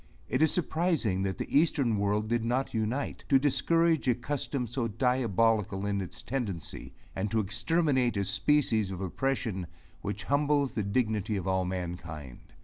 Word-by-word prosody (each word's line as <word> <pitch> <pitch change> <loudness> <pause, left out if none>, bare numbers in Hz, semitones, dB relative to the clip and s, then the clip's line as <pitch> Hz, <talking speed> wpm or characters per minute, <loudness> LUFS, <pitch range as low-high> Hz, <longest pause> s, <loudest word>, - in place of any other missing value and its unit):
It 130 - 0
is 160 - +6
surprising 160 - +1
that 95 -1 -2
the - - -4
eastern 140 -6 +3
world 105 +1 0
did 115 0 0
not 125 +4 -1
unite, 115 +5 -2
to 135 - +6
discourage 165 +3 +2
a 125 - +4
custom 135 +1 -2
so 120 +1 -2
diabolical 115 -4 +1
in 100 -1 0
its 90 - -7
tendency, 115 -10 -4 0.2
and 100 +2 -1
to 110 - +1
exterminate 125 - +1
a 100 - 0
species 110 0 +2
of 95 -2 -5
oppression 100 -2 -2 0.3
which 100 +1 -4
humbles 145 -1 +2
the 110 - -2
dignity 105 0 0
of 95 -1 -4
all 95 -1 +1
mankind. 85 -7 -5
115 Hz, 155 wpm, -29 LUFS, 100-135 Hz, 0.3 s, is